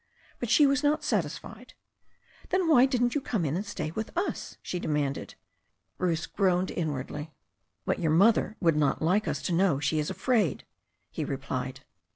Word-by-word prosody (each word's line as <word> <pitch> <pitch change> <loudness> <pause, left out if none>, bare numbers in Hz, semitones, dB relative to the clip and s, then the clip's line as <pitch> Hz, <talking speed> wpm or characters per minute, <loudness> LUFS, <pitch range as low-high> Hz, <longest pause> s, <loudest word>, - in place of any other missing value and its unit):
But 240 - -3
she 290 +5 +6
was 280 0 +3
not 295 +1 +1
satisfied. - - -3 0.7
"^ - - -22
"Then 370 -2 +1
why 270 -5 +6
didn't 245 -2 +1
you 290 - 0
come 215 -10 -1
in 145 +1 -1
and 190 - -1
stay 200 -6 -4
with 220 +6 -4
us?" 370 - -3
she 180 - -3
demanded. 145 -4 -2 0.6
Bruce 170 -3 0
groaned 185 -2 +1
inwardly. 150 -1 -4 0.6
"But - - 0
your 165 - 0
mother 205 +6 +4
would 165 -4 +3
not 150 0 +1
like 190 +6 +2
us - - -2
to 180 - -1
know 170 -5 +3
she 155 +2 0
is 150 - -1
afraid," 205 - 0 0.5
he - - -3
replied. - - -4
185 Hz, 175 wpm, -28 LUFS, 155-240 Hz, 0.7 s, she